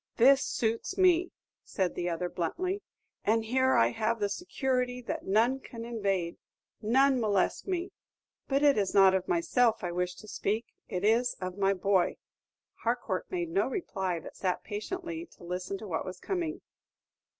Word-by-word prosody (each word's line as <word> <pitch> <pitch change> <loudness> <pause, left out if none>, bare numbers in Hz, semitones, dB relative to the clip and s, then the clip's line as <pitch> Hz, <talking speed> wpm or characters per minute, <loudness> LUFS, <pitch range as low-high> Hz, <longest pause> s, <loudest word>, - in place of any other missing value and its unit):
"This 270 +3 +6
suits 230 +10 -1
me," 360 -2 +4 0.3
said 185 -3 -1
the 175 0 -2
other, 175 +1 -1
bluntly; 365 - -2 0.4
"and 220 +1 +2
here 260 +3 +3
I 115 - +5
have 225 - 0
the 205 -1 0
security 250 - -1
that - - -4
none 230 +7 +3
can 230 -3 -8
invade, 195 -7 -1 0.4
none 265 +4 +4
molest 205 - +1
me. 370 0 -2 0.6
But 275 +1 +1
it 285 -6 +5
is 195 -1 -1
not 195 -1 +7
of 190 -1 0
myself 250 - +2
I 175 - -1
wish 180 +1 -1
to 215 - -13
speak, 215 +2 -1 0.2
it 185 -1 -2
is 235 +3 +3
of 185 -1 -4
my 195 0 +3
boy." 190 -1 +2 0.6
Harcourt - - -1
made 350 -2 -2
no 385 - +2
reply, 190 - -2
but - - -11
sat 185 -2 -1
patiently 335 - -5
to - - -15
listen 180 +2 -4
to 215 - -8
what 165 -4 -2
was 185 -1 -7
coming. 355 -3 -3
225 Hz, 165 wpm, -30 LUFS, 190-275 Hz, 0.6 s, not